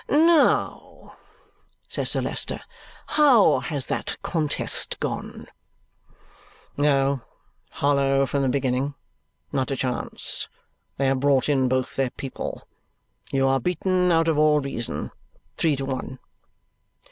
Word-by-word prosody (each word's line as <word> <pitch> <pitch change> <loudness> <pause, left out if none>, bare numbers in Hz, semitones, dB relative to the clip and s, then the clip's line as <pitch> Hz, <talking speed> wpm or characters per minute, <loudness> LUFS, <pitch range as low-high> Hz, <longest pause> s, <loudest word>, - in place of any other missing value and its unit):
"Now," 320 +1 +2 0.7
says - - 0
Sir - - +1
Leicester. - - -2 0.5
"How 275 -9 +5
has 145 -5 -3
that - - -3
contest 155 -4 -1
gone?" - - -5 1.3
"Oh, 140 -2 +2 0.5
hollow 140 -1 +2
from 140 +1 -1
the 135 - +1
beginning. 135 +1 -1 0.6
Not 130 -1 -1
a 135 - -1
chance. 125 -2 0 0.5
They 135 - 0
have 135 0 +2
brought 135 -1 +2
in 135 -3 +2
both 130 0 -1
their 135 -2 +1
people. 130 +1 -7 0.6
You 135 0 +2
are 135 0 +2
beaten 180 +4 +1
out 165 0 +3
of 155 -2 +2
all 150 -1 +4
reason. 135 -5 -4 0.4
Three 160 -3 +1
to 135 0 -4
one." 130 0 -5
140 Hz, 120 wpm, -24 LUFS, 135-155 Hz, 1.3 s, How